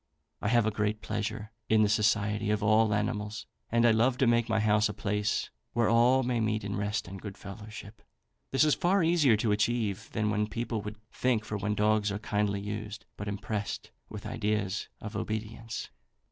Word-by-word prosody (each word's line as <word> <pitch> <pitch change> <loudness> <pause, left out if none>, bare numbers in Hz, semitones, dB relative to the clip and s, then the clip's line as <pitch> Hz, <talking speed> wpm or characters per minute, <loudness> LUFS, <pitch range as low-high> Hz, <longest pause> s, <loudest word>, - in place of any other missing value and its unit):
I - - -1
have 120 -1 +4
a 110 - +1
great 105 +1 -1
pleasure 105 0 -3 0.2
in 110 -1 +5
the - - +4
society 105 0 +1
of 105 -1 +1
all 110 +1 +4
animals, 105 0 -2 0.3
and 115 +1 +4
I 120 - +7
love 120 +3 +3
to 130 - +3
make 120 -1 +3
my 110 -1 +2
house 105 0 +3
a 105 - -5
place 105 0 -1 0.2
where 115 -1 +2
all 120 +3 +5
may 120 -1 0
meet 110 -1 0
in 100 0 -3
rest 105 0 -2
and 95 +1 -8
good 105 -2 -7
fellowship. 105 +1 -10 0.5
This 135 - +3
is 150 -1 +4
far 185 +1 +2
easier 160 -9 +4
to 110 0 +1
achieve 105 -1 0
than 105 -1 0
people 115 0 -3
would 105 +1 -7
think 120 -4 0
for 105 - -4
when 105 +1 -1
dogs 105 0 +2
are 100 - -2
kindly 105 -1 -1
used, 105 +2 -5
but 100 - -6
impressed 100 +1 -4 0.2
with - - -8
ideas 105 -2 -1
of 105 0 -7
obedience. 110 +2 -4
105 Hz, 190 wpm, -30 LUFS, 105-115 Hz, 0.5 s, I